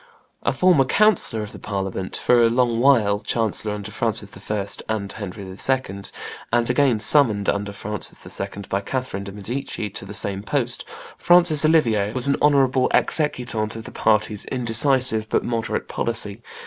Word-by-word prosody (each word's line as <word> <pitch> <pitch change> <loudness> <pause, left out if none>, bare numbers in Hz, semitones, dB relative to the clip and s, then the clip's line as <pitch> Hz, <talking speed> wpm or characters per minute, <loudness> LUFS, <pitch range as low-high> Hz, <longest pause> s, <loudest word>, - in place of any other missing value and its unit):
A - - 0
former 180 -7 +3
councillor 170 - +2
of 105 - -9
the - - -11
Parliament, 95 -2 -4
for 120 -1 +3
a 115 - +4
long 120 -1 +1
while 115 -6 +3
chancellor 110 -1 -2
under 105 -2 -8
Francis - - 0 0.2
I. 105 -2 -2 0.2
and 105 -3 -3
Henry 100 -1 -8
II., 100 +1 -2 0.5
and 120 0 +1
again 130 -3 +2
summoned, 105 -4 +6
under 100 0 -1
Francis 105 0 -5
II., 100 +1 -6
by 100 - -2
Catherine 125 -2 -4
de' 100 - -7
Medici 105 +1 -5
to - - -5
the - - -7
same 100 -1 -1
post, 120 +1 -2 0.3
Francis 175 -4 +4
Olivier, 115 -10 +2
was 125 +1 +4
an 140 - +1
honorable 135 -3 +3
executant 120 -8 0
of 115 - -7
the - - -10
party's 110 -1 0
indecisive 125 -2 +1
but - - 0
moderate 115 -1 -3
policy. 110 -2 -1
115 Hz, 160 wpm, -21 LUFS, 100-130 Hz, 0.5 s, summoned